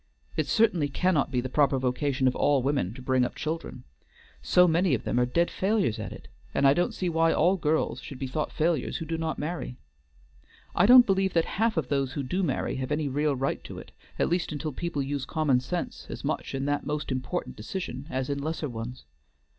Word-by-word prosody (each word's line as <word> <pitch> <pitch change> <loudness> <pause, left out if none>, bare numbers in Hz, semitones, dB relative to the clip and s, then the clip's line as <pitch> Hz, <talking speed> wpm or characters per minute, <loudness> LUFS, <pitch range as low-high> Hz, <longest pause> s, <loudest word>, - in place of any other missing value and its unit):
It 155 - 0
certainly 210 -10 +3
cannot 170 0 +1
be 125 -3 0
the 130 - -4
proper 140 0 +3
vocation 130 +1 0
of 125 - +1
all 140 -3 +2
women 135 -9 0
to 130 - -10
bring 130 0 +2
up 125 - -2
children, 160 +1 -4 0.6
so 180 0 +5
many 170 -2 +3
of 115 - -5
them 120 - 0
are 125 - +2
dead 170 +7 +1
failures 190 - 0
at 110 - -5
it; - - -10 0.3
and 140 - +4
I 135 - +6
don't 175 +4 0
see 185 - -2
why 165 -1 +3
all 180 +5 +3
girls 155 -6 0
should 135 - -8
be 135 - -4
thought 145 +4 -2
failures 160 -4 0
who 165 - -5
do 165 +1 -2
not 160 -1 -2
marry. 150 -5 -4 1.0
I 180 - +5
don't 250 0 +9
believe 195 -2 +1
that 165 -1 +3
half 225 +2 0
those 140 -3 0
who 145 - -3
do 180 +9 -1
marry 180 - -1
have 130 +1 -4
any 150 0 0
real 145 +1 +1
right 135 +1 -2
to - - -8
it, - - -10 0.3
at - - +2
least 175 0 0
until 155 +1 -3
people 160 -2 -2
use 140 0 -3
common 150 -5 +2
sense 170 +8 -4
as - - -7
much - - -2
in 135 0 -2
that 145 0 0
most 150 0 -3
important 130 -1 -3
decision 130 - -5
as 130 -2 -2
in 140 0 -2
lesser 155 0 -3
ones. 120 - -7
145 Hz, 220 wpm, -27 LUFS, 130-170 Hz, 1.0 s, don't